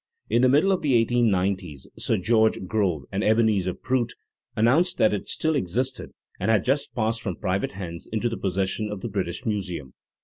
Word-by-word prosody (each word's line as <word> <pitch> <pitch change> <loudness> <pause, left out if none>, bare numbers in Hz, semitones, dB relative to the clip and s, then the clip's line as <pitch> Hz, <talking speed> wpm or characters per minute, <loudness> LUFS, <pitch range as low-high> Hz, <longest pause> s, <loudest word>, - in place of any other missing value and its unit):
In 120 - +4
the 130 - +5
middle 150 +9 +4
of 190 - +1
the 140 -4 +2
eighteen 120 0 +3
nineties 90 -7 -1
Sir - - 0
George 110 0 +2
Grove 90 -7 0
and 100 +2 -1
Ebenezer 105 -5 +2
Prout 125 -2 -1 0.4
announced 135 +12 +3
that 110 - +4
it 105 - -4
still 160 -1 0
existed 125 +3 -1 0.3
and 100 - -1
had 110 -4 +3
just 135 +4 0
passed 115 -1 0
from 95 -6 -3
private 95 +4 -2
hands 85 -3 -7
into 110 +2 0
the 115 - -2
possession 95 +2 -1
of 105 -2 -5
the 120 - -4
British 95 +2 -3
Museum. 90 - -3
110 Hz, 190 wpm, -25 LUFS, 95-120 Hz, 0.4 s, the